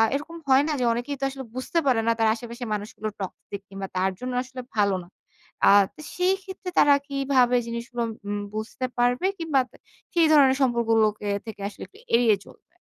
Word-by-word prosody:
এরকম 310 +4 -5
হয় 265 +1 +5
না, - - 0
যে 245 - +1
অনেকেই 245 +5 -3
তো - - -5
আসলে 265 0 -7
বুঝতে 260 +6 -1
পারেনা 230 -2 +3
তার 225 - +4
আশেপাশে 235 +1 -8
মানুষগুলো 210 +1 -4
toxic 195 +1 -7
কিংবা 195 0 -6
তার 190 +1 +2
জন্য 250 0 -4
আসলে 255 0 -8
ভালো 200 -2 +3
না। 175 - -16 0.6
আ - - +8 0.3
তা - - -11 0.2
সেইক্ষেত্রে 380 0 -1
তারা 290 -1 +7
কিভাবে 270 -3 +2
জিনিসগুলো 235 +1 -4 0.2
উম 205 0 -2 0.2
বুঝতে 220 +4 -3
পারবে? 245 +6 +2
কিংবা 315 -5 +1
তা - - -18 0.4
সেই 335 -2 +4
ধরনের 270 -3 +6
সম্পর্কগুলোকে 225 -4 +2 0.2
থেকে 215 -2 -8
আসলে - - -10
একটু 415 - -20 0.2
এড়িয়ে 230 -4 +4
চলবে? - - -19
245 Hz, 175 wpm, -25 LUFS, 220-275 Hz, 0.6 s, আ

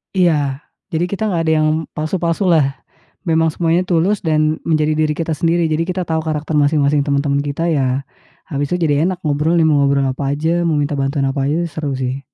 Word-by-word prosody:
Iya, 150 -6 +1 0.3
jadi 165 +1 0
kita 215 +2 -1
gak 175 -5 0
ada 160 0 +2
yang 155 - +2 0.2
palsu-palsu 170 +4 -1
lah. 145 -6 +2 0.5
Memang 160 0 +3
semuanya 165 +2 +1
tulus 185 +4 +1
dan 155 0 +1
menjadi 155 -1 +1
diri 155 -1 +1
kita 165 -1 -2
sendiri, 170 +2 +1
jadi 160 +2 +1
kita 185 0 -1
tau 160 -1 -1
karakter 155 -1 -3
masing-masing 145 0 +3
teman-teman 140 -1 0
kita 145 +3 -3
ya, 135 -4 0 0.4
habis 145 -1 -2
itu - - +2
jadi 145 +3 +2
enak 185 -2 -3
ngobrolnya, 155 +3 +2
mau 145 -2 +3
ngobrol 140 0 +2
apa 135 +1 -3
aja, 165 +4 0
mau 160 - +1
minta 145 +1 -1
bantuan 135 0 0
apa 135 0 -1
aja, 150 +4 0
seru, 150 -2 -3
sih. 130 0 -3
155 Hz, 195 wpm, -18 LUFS, 145-165 Hz, 0.5 s, Memang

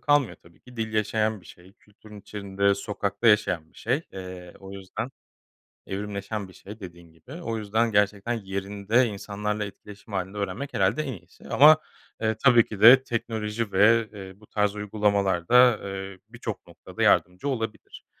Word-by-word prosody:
kalmıyor 145 -4 +2
tabii 85 -2 -22
ki 125 -1 -16
dil 110 -1 -3
yaşayan 110 0 0
bir - - -19
şey, 90 +2 -16
kültürün 105 0 -16
içinde, 100 0 -1
sokakta 100 +1 -3
yaşayan 90 -7 +2
bir - - -17
şey. 130 +8 -1
Eee, 90 -2 -9
o 95 0 -10
yüzden 100 +6 -6 0.8
evrimleşen 100 +1 -4
bir 95 - -16
şey 105 +3 -12
dediğin 85 -3 -11
gibi. 80 +11 -18
O 115 -7 -3
yüzden 110 +2 0
gerçekten 105 +3 +1
yerinde, 100 +3 0
insanlarla 105 0 -3
etkileşim 100 +1 -12
hâlinde 95 +1 -3
öğrenmek 100 +8 -4
herhâlde 155 - +1
en 135 - -4
iyisi. 85 -5 -15
Ama, 155 +2 +7 0.4
eee, 110 -1 +1
tabii 120 -3 +6
ki 105 - -8
de 130 +4 +9
teknoloji 110 -3 -3
ve, 110 +3 +4
eee, 95 -1 -10
bu 105 - -19
tarz 105 -1 0
uygulamalar 100 -4 0
da, 125 -2 +6
eee, 95 -1 -6
birçok - - -7
noktada - - -6
yardımcı 90 +9 +2
olabilir. 115 -5 -5
105 Hz, 160 wpm, -26 LUFS, 95-115 Hz, 0.8 s, de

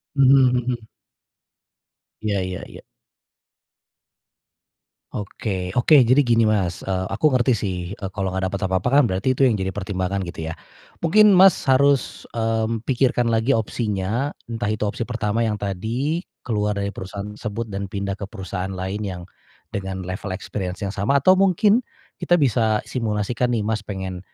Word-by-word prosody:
Mhm 135 -2 +5
mhm. 120 -2 -3 1.3
Iya 105 -3 0
iya 90 -1 -5
iya. - - -11 2.3
Oke, 100 -3 -4
oke 130 - +5
jadi 130 +4 +4
gini 120 -4 +3
Mas, 100 -5 0
eee, 95 -1 -1
aku 155 +9 +1
ngerti 125 -1 +3
sih, 100 -3 -2 0.2
eee, 95 -3 -5
kalau 95 -1 -2
nggak 95 0 -2
dapat 100 - -3
apa-apa 95 +5 0
kan 145 +1 +6
berarti 95 +7 0
itu 130 +1 +3
yang 115 - +2
jadi 95 -1 -2
pertimbangan 95 -1 -2
gitu 85 -3 -5
ya. - - -5 0.5
Mungkin, 210 +5 +5
Mas, 190 -1 +6
harus, 140 +1 +2
mmm, 115 0 -1
pikirkan 120 -2 +1
lagi 115 +4 +2
opsinya 110 +3 -2 0.2
entah 115 -3 -2
itu 105 0 -1
opsi 105 +3 -2
pertama 115 -1 0
yang 105 - 0
tadi 110 - -2 0.2
keluar 105 -3 -1
dari 100 0 -2
perusahaan 100 0 -7
tersebut 110 +1 -5
dan 100 0 -4
pindah 100 -1 -4
ke 100 - -5
perusahaan 95 -2 -5
lain 95 +2 -4
yang 90 -2 -5 0.5
dengan 95 -1 -4
level 95 +1 -4
experience 95 0 -5
yang 100 - -2
sama 125 +8 +1
atau 185 0 +6
mungkin 195 +3 +4 0.4
kita 175 - +3
bisa 115 -7 +2
simulasikan 115 +1 -1
nih, 110 - -1
Mas, 105 -1 -2
pengen, 95 -2 -5
110 Hz, 155 wpm, -22 LUFS, 95-125 Hz, 2.3 s, kan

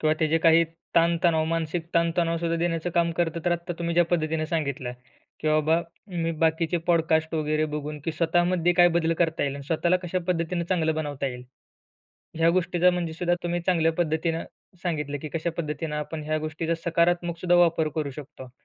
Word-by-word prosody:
किंवा 155 0 +2
त्याचे 160 0 +2
काही 165 0 +5 0.3
ताण-तणाव, 170 -1 +3
मानसिक 165 +1 -2
ताण-तणाव 170 0 +2
सुद्धा 170 0 -1
देण्याचं 165 0 -1
काम 170 0 +2
करतं. 170 -1 0
तर 175 - +2
आत्ता 175 +1 -3
तुम्ही 170 0 -2
ज्या 175 0 +5
पद्धतीने 160 -2 0
सांगितलं, 140 -6 -2 0.5
की 155 - 0
बाबा, 155 +2 +3 0.3
मी 170 -3 -2
बाकीचे 160 +1 +1
पॉडकास्ट 160 -1 +2
वगैरे 155 0 0
बघून, 150 0 -4
की 165 - -1
स्वतःमध्ये 175 +1 +2
काय 175 0 +6
बदल 165 0 +1
करता 165 -2 +1
येईल 140 -1 -1
आणि 140 -1 -8
स्वतःला 170 +3 +2
कशा 180 +1 -1
पद्धतीने 170 0 0
चांगलं 165 -3 0
बनवता 145 -3 -3
येईल. 125 -1 -6 0.9
ह्या 165 0 +4
गोष्टीचा 180 0 +3
म्हणजे 175 -2 -2
सुद्धा 175 +2 0
तुम्ही 175 0 -1
चांगल्या 165 -3 +3
पद्धतीने 165 0 0 0.4
सांगितलं, 150 -5 -2
की 155 - -4
कशा 165 +1 -1
पद्धतीनं 150 -1 -3
आपण 150 +1 -4
ह्या 155 0 0
गोष्टीचा 155 +2 -2
सकारात्मक 170 0 +1
सुद्धा 175 -1 +3
वापर 165 -2 +3
करू 150 -3 -2
शकतो. 135 -2 -10
165 Hz, 175 wpm, -26 LUFS, 155-175 Hz, 0.9 s, काय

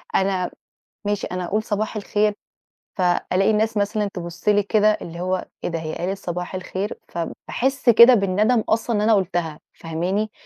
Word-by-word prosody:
أنا 190 -2 +1 0.5
ماشي 205 -1 -1
أنا 180 0 -4
أقول 215 +4 -1
صباح 215 +1 -2
الخير، 210 0 +1 0.6
فألاقي 185 +2 +2
الناس 215 +1 +1
مثلًا 205 0 0
تبُصّ 175 +2 -4
لي 205 0 +4
كده، 215 +1 +3
اللي 170 0 -8
هو 185 +1 -1 0.2
إيه - - -1
ده، 165 -1 -3
هي 155 -1 -5
قالت 190 +3 -2
صباح 180 -1 -5
الخير؟ 185 +2 -4
فباحسّ 255 +9 -2
كده 235 +2 +9
بالندم 215 +3 +2
أصلًا 225 +1 +1
إن 205 - +1
أنا 220 +1 +4
قلتها، 175 -6 -1
فاهماني؟ 180 +6 -2
195 Hz, 160 wpm, -22 LUFS, 180-215 Hz, 0.6 s, كده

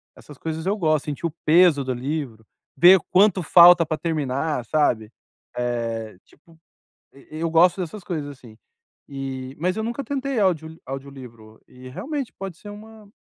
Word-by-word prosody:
Essas 145 -3 -15
coisas 160 +1 -5
eu 200 +3 0
gosto. 155 -6 0
Sentir 150 +2 -5
o 165 - -1
peso 160 -2 +5
do 130 -1 -2
livro. 125 -4 -5 0.3
Ver 185 +3 +7
quanto 195 0 +4
falta 175 +1 +7
pra 155 0 -3
terminar, 150 -4 -2
sabe? 115 -7 0 0.5
Eh, 115 -4 -3
tipo, 165 +2 -24 0.6
eu 140 - -19 0.2
eu 165 - -1
gosto 175 +3 +4
dessas 185 +4 -6
coisas, 155 -5 -4
assim. 125 -5 -14 0.5
E 135 -1 -6
mas 180 +5 -1
eu 220 - -2
nunca 235 +5 -4
tentei 275 0 -3
audio 160 -4 -1
audiolivro. 125 -5 -10
E 125 0 -13
realmente 275 - -5
pode 190 -4 -7
ser 205 +3 -11
uma 215 0 -13
155 Hz, 160 wpm, -22 LUFS, 130-185 Hz, 0.6 s, Ver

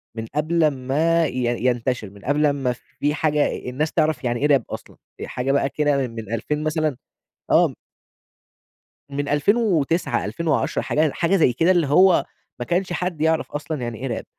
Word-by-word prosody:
من 110 -1 -4
قبل 160 +2 +1
امّا 155 +4 +2
ي 120 -3 -2
ينتشر، 120 -3 0
من 100 0 -16
قبل 145 +2 +2
امّا 135 -4 +1 0.3
في 145 +1 +1
حاجة 150 -2 +1
الناس 150 +5 -2
تعرف 155 -5 +1
يعني 120 -1 -1
إيه 145 - +2
راب 140 -5 +3
أصلًا، - - -8 0.2
في - - -6
حاجة 125 +2 -2
بقى 140 0 +2
كده 145 -3 +1
من 115 -1 -7
2000 150 +7 -2
مثلًا 155 -3 0 0.5
آه. - - +4 1.4
من 145 +1 -3
2009، 170 0 +1
2010، 160 -4 -1
حاجة 155 -1 +1
حاجة 175 +3 +1
زي 155 -9 +3
كده، 165 +9 +3
اللي 170 -5 +2
هو 180 +5 +5 0.3
ما 120 - -3
كانش 180 +3 -1
حد 175 -4 -3
يعرف 160 0 +1
أصلًا 150 -1 -4
يعني 120 -2 -4
إيه 135 - -3
راب، 115 - -4
145 Hz, 170 wpm, -22 LUFS, 125-160 Hz, 1.4 s, هو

